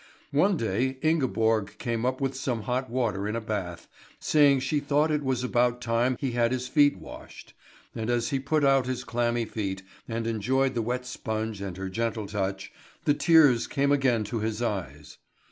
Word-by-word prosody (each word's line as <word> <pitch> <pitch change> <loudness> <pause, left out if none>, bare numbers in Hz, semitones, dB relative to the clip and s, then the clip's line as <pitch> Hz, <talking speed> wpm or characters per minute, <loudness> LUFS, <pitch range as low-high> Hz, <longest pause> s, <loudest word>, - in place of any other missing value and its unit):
One 185 +7 +3
day 125 +3 -1
Ingeborg 115 -9 +1
came 120 0 -2
up 130 0 -1
with 135 -1 -1
some 125 -4 -2
hot 125 +2 -2
water 115 -5 -1
in 105 - -2
a - - 0
bath, 100 -6 -5 0.3
saying 140 -3 +4
she 140 +3 0
thought 145 +2 +1
it 150 -1 +1
was 130 -2 -1
about 125 -1 +1
time 120 +2 0
he 135 -3 -1
had 120 0 +1
his 130 0 -2
feet 145 0 +4
washed; - - -12 0.4
and 110 +1 -4
as 120 -1 0
he 135 - 0
put 150 +3 0
out 135 -2 +3
his 130 -1 -3
clammy 120 0 0
feet, 95 -4 -4 0.2
and 115 -1 -3
enjoyed 130 +4 +1
the 115 - -1
wet 125 +3 -2
sponge 110 -4 -4
and 95 -3 -5
her 95 0 -4
gentle 115 +2 -2
touch, 95 -1 -3 0.3
the 145 - +4
tears 145 -6 +5
came 140 +1 +1
again 130 -6 +2
to 115 +2 -3
his 110 0 -2
eyes. 85 - -4
120 Hz, 185 wpm, -27 LUFS, 110-135 Hz, 0.4 s, tears